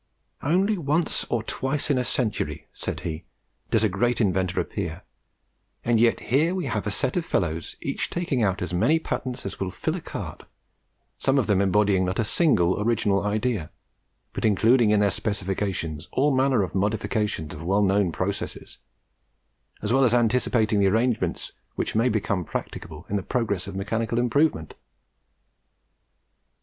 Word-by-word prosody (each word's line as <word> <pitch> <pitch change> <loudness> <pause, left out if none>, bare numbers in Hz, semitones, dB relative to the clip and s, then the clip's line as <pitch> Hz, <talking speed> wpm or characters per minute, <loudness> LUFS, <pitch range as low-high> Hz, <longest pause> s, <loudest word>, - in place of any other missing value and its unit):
"Only 190 +6 +2
once 155 +2 0
or 115 -2 0
twice 140 +5 -1
in 130 - +2
a - - +1
century," 90 - -2
said - - -4
he, 80 -1 -4 0.5
"does - - +2
a - - +5
great 115 +5 0
inventor 95 -4 +1
appear, - - -4 0.8
and 120 -1 +3
yet 115 0 +3
here 160 +7 +3
we 180 -4 -2
have 105 -4 -2
a - - +1
set 115 +5 0
of 175 - +1
fellows 85 - -2
each - - -2
taking 165 -8 -1
out 95 -4 +1
as 90 - -4
many 150 - +3
patents 125 -5 -4
as 100 - -5
would 95 -1 -3
fill - - -1
a - - -5
cart, - - -6 0.8
some 135 +1 +2
of 130 - +3
them 100 -2 +2
embodying 100 -1 +3
not 90 +1 -1
a 115 - +2
single 105 - +2
original 105 -3 +1
idea, 105 -4 -1 0.6
but - - -4
including 110 +3 +4
in 105 -1 +4
their 100 -1 +3
specifications 95 -6 -2
all 140 +1 +3
manner 130 -4 +3
of 95 - -5
modifications 105 -4 -1
of 75 - -8
well 100 +5 +2
known 100 -2 +2
processes, 100 +4 -4 1.0
as 105 - 0
well 135 +1 +4
as 125 -2 +4
anticipating 115 -2 +2
the 100 - +4
arrangements 115 +2 0 0.2
which - - -2
may 115 +3 +3
become 105 -4 0
practicable 80 0 -6
in 105 - -1
the - - -1
progress 105 -5 -1
of 100 - -7
mechanical 110 +4 -1
improvement." 125 - +1
105 Hz, 160 wpm, -25 LUFS, 95-125 Hz, 1.0 s, a